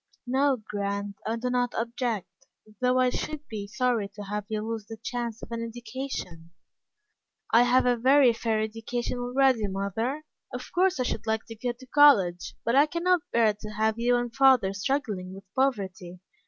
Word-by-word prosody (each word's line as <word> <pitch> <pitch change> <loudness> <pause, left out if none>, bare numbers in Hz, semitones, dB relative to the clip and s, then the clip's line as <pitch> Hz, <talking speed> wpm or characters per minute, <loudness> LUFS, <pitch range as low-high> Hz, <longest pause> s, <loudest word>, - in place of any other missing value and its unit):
"No, 265 +2 +2
Grant, 200 0 -3
I 225 - 0
don't 245 +1 -1
object, 225 -6 -3 0.3
though 250 0 +2
I 255 -1 +3
should 305 +2 -4
be 210 -3 -6
sorry 235 -2 0
to 205 - -7
have 205 +1 -4
you 215 -1 -2
lose 225 -2 -4
the 225 - -8
chance 235 0 -4
of - - -9
an 230 0 -3
education." 230 -7 -6 1.0
"I 230 - +6
have 245 +1 +4
a 245 -1 +3
very 260 +1 +5
fair 225 -1 -1
education 225 +3 -3
already, 245 -3 +2
mother. 200 +9 -2 0.3
Of - - -7
course 370 -1 +2
I - - +2
should 245 - -3
like 220 0 0
to 225 - -7
go 245 +2 -3
to 250 +2 -15
college, 250 -12 +4
but 235 - +2
I 285 +2 +6
can't 345 +2 +1
bear 225 -2 +3
to 210 +1 -9
have 220 +1 0
you 245 +1 +3
and 240 0 -2
father 260 -8 +5
struggling 200 -4 -2
with 195 - -11
poverty. 190 -9 -1
235 Hz, 175 wpm, -27 LUFS, 210-255 Hz, 1.0 s, I